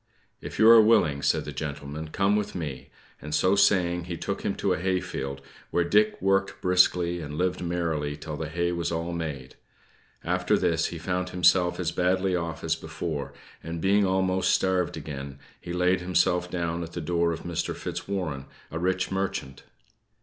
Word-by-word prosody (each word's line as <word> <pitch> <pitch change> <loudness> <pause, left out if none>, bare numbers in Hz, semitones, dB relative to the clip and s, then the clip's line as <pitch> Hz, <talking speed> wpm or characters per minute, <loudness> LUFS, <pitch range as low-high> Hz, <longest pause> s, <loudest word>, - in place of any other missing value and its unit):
"If - - -7
you 110 - +6
are 115 0 +10
willing," 80 -10 +3
said - - +1
the - - -5
gentleman, 75 +1 -5
"come 100 +6 +1
with 105 -1 -2
me;" 75 -7 -5 0.3
and 75 +1 -3
so 95 +2 +3
saying, 90 -3 +3
he 85 -1 -5
took - - -3
him - - -1
to - - +1
a - - -2
hayfield, 85 -7 -2 0.3
where 85 - +1
Dick 105 +5 +2
worked 95 +1 +1
briskly, 90 -1 +3
and 75 -1 -6
lived 90 +1 0
merrily 80 -4 -2
till 80 -2 -6
the 80 +1 -4
hay 85 +2 0
was 85 -1 -2
all 85 +1 -2
made. 75 -7 -5 0.7
After - - +1
this, - - +1
he - - -6
found 90 0 -2
himself 90 0 +3
as 90 -2 -1
badly 95 +1 +1
off 85 -2 -3
as 80 0 +1
before; 80 -2 -5 0.3
and 85 0 -5
being 100 +4 +3
almost 95 0 +1
starved 90 -3 0
again, 70 -2 -7 0.2
he 85 - -8
laid 90 +1 +2
himself 90 0 +1
down 85 -1 -2
at 85 0 -7
the - - -4
door 85 +1 +1
of 80 - -4
Mr. 85 -1 -3
Fitzwarren, 80 -9 -4 0.2
a 80 - -3
rich 90 +1 0
merchant. 95 -8 -3
85 Hz, 180 wpm, -27 LUFS, 80-90 Hz, 0.7 s, are